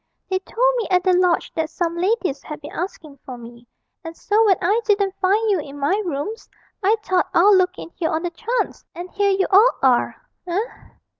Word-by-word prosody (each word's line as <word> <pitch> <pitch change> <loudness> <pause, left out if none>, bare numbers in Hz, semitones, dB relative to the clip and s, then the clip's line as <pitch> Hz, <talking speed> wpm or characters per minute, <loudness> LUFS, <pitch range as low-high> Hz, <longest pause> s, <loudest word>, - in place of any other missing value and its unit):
They 375 - +1
told - - 0
me 465 - -2
at 360 -1 +2
the 370 - +3
lodge 360 -1 +1
that 320 -1 -2
some 340 -1 -2
ladies 365 -6 -1
had 300 0 -8
been 295 +1 -10
asking 315 -5 -6
for 255 -3 -8
me, 235 0 -13 0.4
and 330 0 -8
so 425 +2 +2
when 385 - +4
I 405 +6 +1
didn't 400 -3 +1
find 405 +4 +2
you 385 - +2
in 290 -1 -8
my 315 +9 0
rooms, 345 - -5 0.3
I 415 +3 +3
thought 370 -3 0
I'd 400 +5 +6
look 370 -1 +2
in - - -9
here 335 -2 -2
on 315 +2 -2
the 350 - -2
chance 465 +8 -3
and 355 +2 -8
here 405 0 +1
you 385 0 +2
all 420 +6 +6
are, 255 -2 +3 0.3
eh?' 350 +1 -2
365 Hz, 210 wpm, -21 LUFS, 320-405 Hz, 0.4 s, I'd